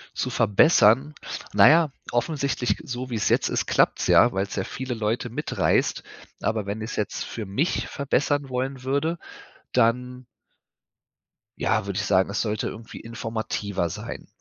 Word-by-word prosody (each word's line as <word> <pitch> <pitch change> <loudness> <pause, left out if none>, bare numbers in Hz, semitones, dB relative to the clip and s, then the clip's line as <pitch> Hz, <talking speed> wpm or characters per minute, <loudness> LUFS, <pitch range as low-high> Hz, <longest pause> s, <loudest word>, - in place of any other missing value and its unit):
Zu - - -1
verbessern? 115 - +4 0.4
Na - - +8
ja, 160 -2 +4 0.2
offensichtlich 130 -4 0
g - - -13
so 125 +1 -5
wie 120 - -3
es 110 - 0
jetzt - - +2
ist, - - -1
klappt's - - +2
ja, - - +6
weil's 95 +1 -2
ja 95 - -1
viele 130 +5 -5
Leute 110 +2 -1
mitreißt, 115 - 0 0.4
aber 110 -2 -1
wenn 100 +2 -4
ich's 110 +1 -5
jetzt 105 - -2
für 110 - -6
mich 105 - -1
verbessern 140 0 0
wollen 130 +1 -3
würde, 140 +6 0 0.6
dann 125 +1 +1 1.3
ja, - - 0
würde 100 -1 -4
ich 105 - -1
sagen, 95 -2 +3
es 100 - -1
sollte 110 -1 -1
irgendwie 110 +1 -8
informativer 110 -5 -3
sein. - - -7
115 Hz, 155 wpm, -25 LUFS, 105-130 Hz, 1.3 s, Na